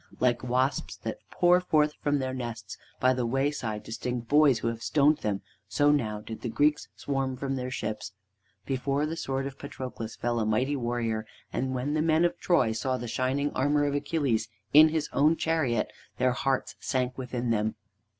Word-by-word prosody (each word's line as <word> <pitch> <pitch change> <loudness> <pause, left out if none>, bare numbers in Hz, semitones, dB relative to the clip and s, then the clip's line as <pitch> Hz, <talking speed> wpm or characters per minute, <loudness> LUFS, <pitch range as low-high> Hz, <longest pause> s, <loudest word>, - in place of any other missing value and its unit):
Like 125 -1 +2
wasps 130 +2 0
that - - -4
pour 180 0 +4
forth 150 -4 +2
from 145 -2 +2
their 130 -1 -2
nests 115 -5 -5 0.2
by 130 0 +4
the 125 -1 -1
wayside 135 -4 -1
to - - -9
sting 120 +2 -3
the - - -17
boys 145 0 +5
who - - -2
have 115 0 -5
stoned 150 +3 +3
them, 100 -2 -2 0.2
so 145 0 +3
now 110 -8 0
did 110 +1 -8
the 120 - -3
Greeks 150 +6 +2
swarm 135 -2 -2
from 135 +1 -2
their 125 -1 -3
ships. 110 -5 -4 0.5
Before 140 +2 0
the 160 +2 -3
sword 135 -4 -2
of 140 -1 -7
Patroclus 125 -5 -6
fell 120 0 -1
a 110 - 0
mighty 125 +7 +1
warrior, 120 -3 -2 0.3
and 130 0 -1
when 130 +4 -1
the 155 - +1
men 160 +1 +3
of 175 - -1
Troy 150 -11 +3
saw 130 +4 -1
the 120 - -5
shining 130 +5 0
armor 145 +2 +2
of 145 - 0
Achilles 140 -6 0 0.3
in 155 +2 +9
his 155 -1 -1
own 150 +4 +4
chariot 155 -10 0 0.2
their 130 - +3
hearts 135 +1 -1
sank 125 -1 -1
within 125 -2 -3
them. 110 -1 0
130 Hz, 190 wpm, -28 LUFS, 120-145 Hz, 0.5 s, in